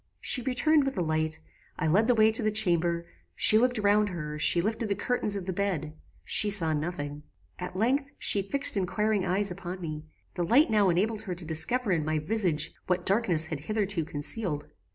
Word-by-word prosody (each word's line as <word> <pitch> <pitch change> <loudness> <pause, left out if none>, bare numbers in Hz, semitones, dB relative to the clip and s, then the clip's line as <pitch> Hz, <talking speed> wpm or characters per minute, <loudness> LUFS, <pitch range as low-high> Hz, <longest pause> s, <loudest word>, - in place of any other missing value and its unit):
"She 250 - +1
returned 275 +5 +2
with 270 -4 -4
a 180 - 0
light; 155 0 -2 0.4
I - - -2
led 195 +8 +2
the 245 - +3
way 220 0 +4
to 220 - -1
the 215 - +1
chamber; 170 -5 +1 0.3
she 215 - +6
looked 250 +1 +1
round 210 0 +2
her; 150 -4 -6
she 170 - +4
lifted 220 +4 -2
the 200 - 0
curtain 210 -2 -1
of 190 - -6
the 185 - -3
bed; 175 -6 -3 0.3
she 210 - +4
saw 170 -6 +2
nothing. 150 -2 -5 0.4
"At 180 0 -7
length, 265 +8 0
she 200 - +1
fixed 280 +8 +2
inquiring 200 +1 -1
eyes 195 +2 -1
upon 180 +1 -7
me. 155 -3 -7 0.3
The 175 - -3
light 240 - +3
now 205 -3 +3
enabled 210 +5 0
her 190 -5 -6
to 175 -1 -9
discover 195 +9 +1
in 165 -4 0
my 155 +1 -1
visage 160 -2 -1
what 180 -1 -1
darkness 190 -6 +3
had 160 -2 -5
hitherto 200 +1 -2
concealed. 150 +1 -2
190 Hz, 195 wpm, -27 LUFS, 160-215 Hz, 0.4 s, she